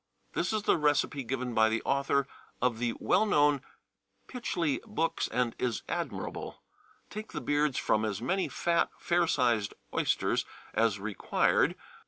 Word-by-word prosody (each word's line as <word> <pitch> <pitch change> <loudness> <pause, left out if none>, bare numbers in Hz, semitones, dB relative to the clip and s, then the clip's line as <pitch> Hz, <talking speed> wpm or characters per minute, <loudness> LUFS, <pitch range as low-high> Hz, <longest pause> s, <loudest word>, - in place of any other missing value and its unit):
2. - - -2
This - - +1
is 215 -1 -1
the - - +3
recipe 145 -2 +1
given 125 0 -3
by 110 0 +5
the 110 +1 -1
author 140 0 +1 0.3
of 120 -2 +1
the 120 -1 0
well - - +3
known 145 -9 +3 0.7
Pytchley 175 - -1
Books, 165 -6 0
and 120 0 0
is 120 -3 -1
admirable. - - -4 0.5
Take 215 +1 -7
the - - -2
beards 145 -2 +1
from 110 - +2
as 105 -3 -1
many 185 +11 0
fat, 170 -1 +1
fair 175 0 +2
sized 120 -8 +1 0.2
oysters - - +1 0.3
as 110 -3 +2
required. 100 -2 +1
135 Hz, 150 wpm, -30 LUFS, 115-165 Hz, 0.7 s, by